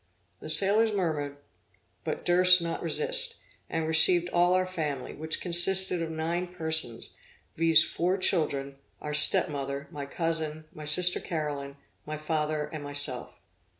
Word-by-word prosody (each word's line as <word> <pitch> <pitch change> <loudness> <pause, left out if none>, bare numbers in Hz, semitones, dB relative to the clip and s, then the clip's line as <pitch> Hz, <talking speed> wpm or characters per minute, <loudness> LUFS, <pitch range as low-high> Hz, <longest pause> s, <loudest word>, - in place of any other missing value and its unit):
The - - -10
sailors 215 +3 +1
murmured, 155 -8 -3 0.7
but - - -5
durst 180 +1 +6
not 170 -1 -5
resist, 485 0 0 0.3
and 160 -1 -3
received 170 +2 +5
all 175 +1 +2
our 185 0 +1
family, 155 -7 -5
which 160 +1 -3
consisted 180 +1 +2
of 165 - -4
nine 165 +3 -4
persons, 160 -9 -3 0.4
viz. 165 -1 +4
four 180 +3 -2
children, 140 -7 0 0.2
our 150 - -6
step 150 +1 +5
mother, 140 0 -6
my 140 -1 -7
cousin, 160 -1 -4
my 155 - -10
sister 180 +4 +3
Caroline, 145 -4 -5 0.3
my 155 0 -7
father 155 -1 -3
and 155 -2 -7
myself. 145 -3 0
160 Hz, 140 wpm, -27 LUFS, 150-180 Hz, 0.7 s, durst